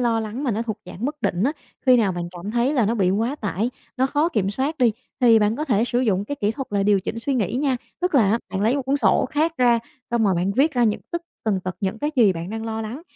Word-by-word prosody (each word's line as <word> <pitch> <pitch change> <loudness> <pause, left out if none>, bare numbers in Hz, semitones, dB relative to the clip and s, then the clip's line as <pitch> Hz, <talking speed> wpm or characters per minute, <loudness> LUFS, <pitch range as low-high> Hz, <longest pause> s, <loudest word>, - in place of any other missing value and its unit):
lo 230 -2 +2
lắng 220 +6 -4
mà 260 - +1
nó 225 +1 -1
thuộc 220 -3 -4
dạng 210 - -7
bất 295 +2 -3
định 175 +1 0
á, 280 - +2 0.3
khi 255 - +7
nào 210 -6 +2
bạn 175 0 -4
cảm 180 +3 -7
thấy 240 +4 +1
là 235 -6 +3
nó 230 - +1
bị 190 -5 +2
quá 230 +9 0
tải, 215 +1 -2 0.3
nó 260 +1 +2
khó 295 +4 +1
kiểm 210 - 0
soát 275 +8 -2
đi 240 -4 +4 0.3
thì 235 -3 +6
bạn 210 +1 +1
có 300 - -2
thể 230 -7 +2
sử 245 0 0
dụng 205 -5 +1
cái 285 +6 -5
kỹ 205 - +2
thuật 270 +1 -5
là 200 -1 +1
điều 200 -1 +3
chỉnh 230 - -4
suy 270 +4 -1
nghĩ 225 -4 0
nha. 265 0 +1 0.2
Tức 360 -2 -1
là 220 -8 +5
á 225 - +2
bạn 190 - -2
lấy 235 +6 +3
một 280 - -1
cuốn 270 +2 +1
sổ 280 - +3
khác 310 +2 +1
ra, 240 -2 +4 0.3
xong 235 -2 +2
rồi 195 - +3
bạn 180 +3 0
viết 280 +8 +3
ra 245 - +3
những 215 -2 +1
tất 340 -1 -3 0.2
tần 205 -4 +1
tật 185 0 -5
những 195 +2 -2
cái 295 +4 -1
gì 220 -6 +5
bạn 170 +1 -6
đang 225 0 -4
lo 225 0 -3
lắng, 235 +8 -6
230 Hz, 295 wpm, -23 LUFS, 205-265 Hz, 0.3 s, khi